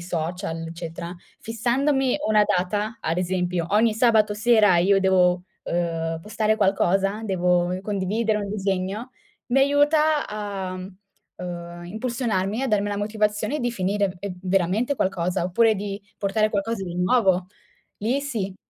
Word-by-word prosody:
social, 170 0 -4
eccetera, 170 +1 -6 0.3
fissandomi 255 +4 +1
una 215 -1 +4
data, 205 +5 -1
ad 165 +2 -1
esempio, 180 -1 -1
ogni 215 +2 +3
sabato 220 -2 +3
sera 215 -3 +4
io 195 +3 +4
devo, 180 -2 +3 0.2
uhm, 165 -1 -2
postare 215 +1 0
qualcosa, 195 0 +1
devo 180 -2 +1
condividere 210 +2 0
un 205 -1 -4
disegno, 195 +3 -2 0.4
mi 250 +2 +2
aiuta 295 +2 +3
a, 200 -3 -4
uhm, 180 -2 -9
impulsionarmi, 220 0 -2
a 270 - 0
darmi 205 -2 +1
la 205 - -2
motivazione 210 +4 -1
di 245 -2 -1
finire 195 -2 0
e 200 -2 -5
veramente 195 +7 +1
qualcosa, 180 -6 -1
oppure 220 +6 +3
di 200 0 -5 0.2
portare 210 +2 +1
qualcosa 205 0 -2
di 175 -2 -6
nuovo. 185 -1 +2 0.5
Lì 240 +7 0
sì. 220 -9 -3
200 Hz, 130 wpm, -24 LUFS, 180-220 Hz, 0.5 s, una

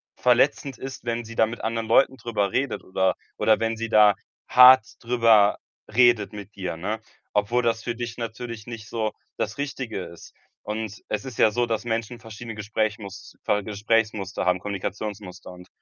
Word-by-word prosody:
verletzend 125 +1 +2
ist, 130 0 -8
wenn 115 0 -2
sie 115 +1 -10
da 110 - +4
mit 115 +2 -7
anderen 115 0 -2
Leuten 135 - +4
drüber 105 -6 -1
redet 135 -1 -1
oder 95 0 +1 0.2
oder 110 - +3
wenn 115 0 0
sie 115 0 -4
da 105 -2 +6 0.3
hart 125 -2 +8 0.2
drüber 115 -4 +4 0.4
redet 120 -3 +4
mit 105 0 -10
dir, 90 -4 -4
ne, 105 +6 -3 0.3
obwohl 105 +4 +2
das 115 -1 0
für 120 - -2
dich 120 -1 -5
natürlich 115 -1 -6
nicht 115 -3 -8
so 110 -1 -2 0.2
das 110 0 -3
Richtige 130 -8 -4
ist. 85 - -13 0.3
Und 110 0 -5
es 105 - -2
ist 130 -3 -8
ja 110 - +5
so, 120 +3 +1
dass 115 -1 -2
Menschen 115 +1 -3
verschiedene 115 0 -9
Gesprächmuster 105 -1 -3
Gesprächsmuster 105 -1 -1
haben, 90 0 +2
Kommunikationsmuster. 100 -1 -6
Und 90 0 -13
110 Hz, 165 wpm, -24 LUFS, 105-120 Hz, 0.4 s, hart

